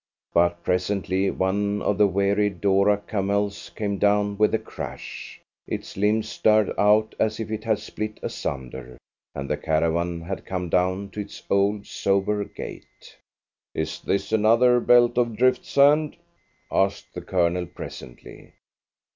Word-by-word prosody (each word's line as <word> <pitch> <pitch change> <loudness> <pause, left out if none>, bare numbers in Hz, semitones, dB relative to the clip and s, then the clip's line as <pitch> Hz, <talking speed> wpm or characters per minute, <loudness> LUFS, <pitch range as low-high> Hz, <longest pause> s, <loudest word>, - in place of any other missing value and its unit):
But 85 0 +2
presently 95 +1 0
one 100 +2 -1
of 105 - 0
the 105 - +6
weary 100 +2 +1
doora 100 +2 +2
camels 100 -3 -1
came 100 -2 -2
down 105 0 +2
with 105 +1 +3
a - - +3
crash, - - -8 0.3
its - - -5
limbs 105 +2 +1
starred 110 -1 +2
out 105 +1 +3
as 110 0 0
if 110 -1 -4
it 110 0 -4
had 110 -2 +2
split 110 +1 -6
asunder, 65 -2 -5 0.4
and 70 0 -4
the - - -1
caravan 85 +2 0
had 95 +3 -5
to - - -20
come 90 -2 -4
down 95 +3 0
to 105 - -7
its 100 0 -7
old 100 +1 +2
sober 100 +1 0
gait. 100 - -11 0.6
"Is - - -3
this 100 +1 -1
another 115 +3 +4
belt 120 0 +4
of 120 -3 0
drift 130 +1 +2
sand?" 145 +3 +3 0.5
asked 95 +1 0
the - - -6
Colonel 90 -1 0
presently. 60 -3 -11
100 Hz, 145 wpm, -24 LUFS, 95-110 Hz, 0.6 s, the